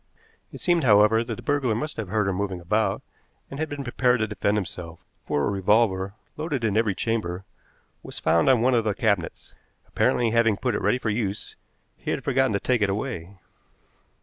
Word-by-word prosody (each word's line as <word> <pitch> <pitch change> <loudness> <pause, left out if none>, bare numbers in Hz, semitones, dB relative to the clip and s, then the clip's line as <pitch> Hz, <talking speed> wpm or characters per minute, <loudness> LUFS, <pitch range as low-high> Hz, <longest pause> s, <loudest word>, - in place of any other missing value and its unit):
It - - -9
seemed, 175 -3 +2
however, 105 0 +5
that - - -5
the 120 - -11
burglar 135 -4 +1
must 150 +7 -4
have 110 -3 -4
heard 105 +2 0
her 95 - 0
moving 95 -1 -3
about 105 +6 0 0.5
and 140 - -6
had 155 -1 -2
been 145 -1 -5
prepared 125 0 +2
to 110 - +1
defend 105 0 0
himself, 85 -4 -6 0.3
for 75 - 0
a - - 0
revolver, 100 -1 +1 0.2
loaded 150 -5 -3
in 105 -3 +1
every 110 -3 +2
chamber, 95 -5 -2 0.6
was - - -9
found 85 +9 +2
on 125 -3 +4
one 130 +1 +3
of 115 -2 +3
the 105 -2 -1
cabinets. 100 -7 -1 0.3
Apparently, 120 -2 +1
having 115 -3 +3
put 125 +2 -1
it - - -2
ready 125 - +2
for 115 -4 -2
use, 105 -2 -3 0.4
he - - -7
had - - -2
forgotten 135 -3 +1
to 100 - +1
take 125 0 0
it 100 - +2
away. 100 -3 -4
110 Hz, 200 wpm, -25 LUFS, 100-125 Hz, 0.6 s, however